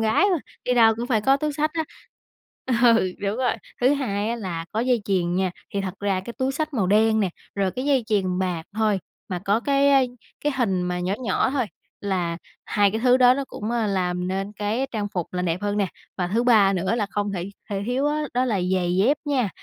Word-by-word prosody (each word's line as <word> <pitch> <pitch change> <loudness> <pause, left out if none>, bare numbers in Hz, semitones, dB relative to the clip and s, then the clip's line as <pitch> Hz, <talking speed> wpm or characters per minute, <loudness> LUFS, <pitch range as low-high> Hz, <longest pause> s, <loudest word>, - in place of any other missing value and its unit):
gái 225 - +3
mà, 345 - +2 0.3
đi 250 - +1
đâu 225 -2 +6
cũng 240 +1 -3
phải 225 -5 +2
có 270 +5 +4
túi 300 +1 -2
xách 305 +2 0
á. 320 -1 0 1.0
Ừ, 230 -6 +5
đúng 200 +1 -1
rồi, 255 0 +1 0.3
thứ 260 +4 +4
hai 210 -6 -1
á, 235 - -1
là 175 -7 -4
có 220 - 0
dây 245 -3 +1
chuyền 180 -3 0
nha, 190 0 +1 0.2
thì 200 - +1
thật 190 -1 -4
ra 195 -2 0
cái 235 - -8
túi 265 +1 0
xách 305 0 -3
màu 205 -6 +1
đen 220 +2 +4
nè, 190 -3 +1 0.2
rồi 195 -2 +1
cái 255 +6 -4
dây 270 -5 +2
chuyền 185 -4 0
bạc 180 -3 -1
thôi, 215 -3 +2 0.3
mà 180 -2 -2
có 205 +4 +2
cái, 280 +1 +3
a, 275 - +6 0.4
cái 295 - +2
hình 195 -8 +1
mà 180 0 -2
nhỏ 180 +2 0
nhỏ 250 - +1
thôi 260 -4 0 0.3
là 180 -4 -1 0.3
hai 205 -1 +2
cái 220 - -2
thứ 250 +1 +5
đó 250 0 +6
nó 275 0 -2
cũng, 215 +2 -5
a, 235 -2 0
làm 180 -2 -1
nên 195 +2 -3
cái 215 +6 -1
trang 205 -2 -2
phục 175 -3 -3
là 180 0 -2
đẹp 175 +2 -1
hơn 205 0 -1
nè. 200 - +2 0.3
Và 180 -1 0
thứ 225 +6 +1
ba 215 -5 +5
nữa 190 +4 0
là 210 -4 0
không 205 -1 -1
thể 185 0 -4 0.2
thể 195 -1 -2
thiếu 260 +4 0
á, 300 +1 0
đó 250 +1 +2
là 215 -6 0
giày 180 -1 0
dép 245 +10 +3
nha, 265 -8 +1
210 Hz, 240 wpm, -24 LUFS, 190-250 Hz, 1.0 s, đâu